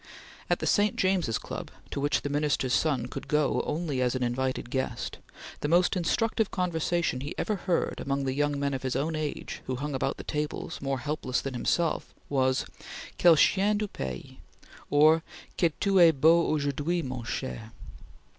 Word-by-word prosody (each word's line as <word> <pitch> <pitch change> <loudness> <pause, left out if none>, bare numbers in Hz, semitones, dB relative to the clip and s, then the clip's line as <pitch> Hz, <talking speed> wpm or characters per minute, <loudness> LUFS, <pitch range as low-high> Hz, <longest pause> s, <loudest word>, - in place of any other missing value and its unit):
At - - +3
the - - -4
St. 205 0 +3
James's 185 - +1
Club, - - -6 0.2
to - - -3
which 145 0 +1
the 145 - -2
Minister's 145 -3 0
son 140 -7 +1
could - - -7
go 150 -2 +2
only 150 -5 -1
as 125 0 +1
an 130 - -1
invited 125 0 -2
guest, 130 -1 -3 0.4
the - - -2
most 175 +5 +3
instructive 220 +4 +1
conversation 170 -5 -1
he 140 - -5
ever 215 - 0
heard 180 -2 -1
among 140 0 -1
the 130 - 0
young 145 0 0
men 140 0 0
of 130 - -3
his 130 -1 -2
own 155 +4 0
age 155 -1 -4
who 130 - -1
hung 145 +3 -4
about 135 0 -1
the - - -7
tables, 150 0 -4
more 135 -1 -1
helpless 135 -2 -2
than 135 - -4
himself, 160 +7 -1
was: 130 -2 +1 0.5
"Quel 170 -2 +7
chien 200 +7 +3
de 210 0 -1
pays!" 65 - -6 0.5
or, 155 +2 +5 0.3
"Que 170 - +3
tu 195 -2 +3
es 170 -2 +8
beau 165 +4 +4
aujourd'hui, 150 +3 0
mon 130 -3 -5
cher!" 115 -1 -5
145 Hz, 175 wpm, -28 LUFS, 130-170 Hz, 0.5 s, es